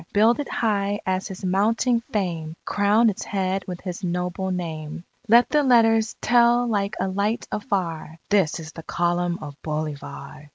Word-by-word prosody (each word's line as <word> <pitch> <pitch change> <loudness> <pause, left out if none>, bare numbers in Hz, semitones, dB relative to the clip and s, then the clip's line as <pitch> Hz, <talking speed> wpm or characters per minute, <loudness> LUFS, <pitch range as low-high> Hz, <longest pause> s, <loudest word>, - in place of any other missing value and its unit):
Build 225 +5 +4
it 290 - -3
high 205 -2 0
as 185 +1 -1
his 190 -1 -7
mounting 225 +6 +2
fame! 170 -7 -2
Crown 210 +3 +3
its 190 - -7
head 195 -1 -1
with 180 -2 -6
his 180 0 -6
noble 180 +1 -2
name! 165 -3 -4 0.2
Let 235 +2 +6
the 300 - +4
letters 225 -4 +4
tell 240 +1 +4
like 205 -3 -1
a - - 0
light 200 +4 -1
afar, 175 - -3
"This 190 -5 +2
is 160 -1 -8
the 165 - -9
Column 175 +1 0
of 145 -1 -9
Bolivar!" 150 -1 -6
190 Hz, 160 wpm, -24 LUFS, 170-220 Hz, 0.2 s, Let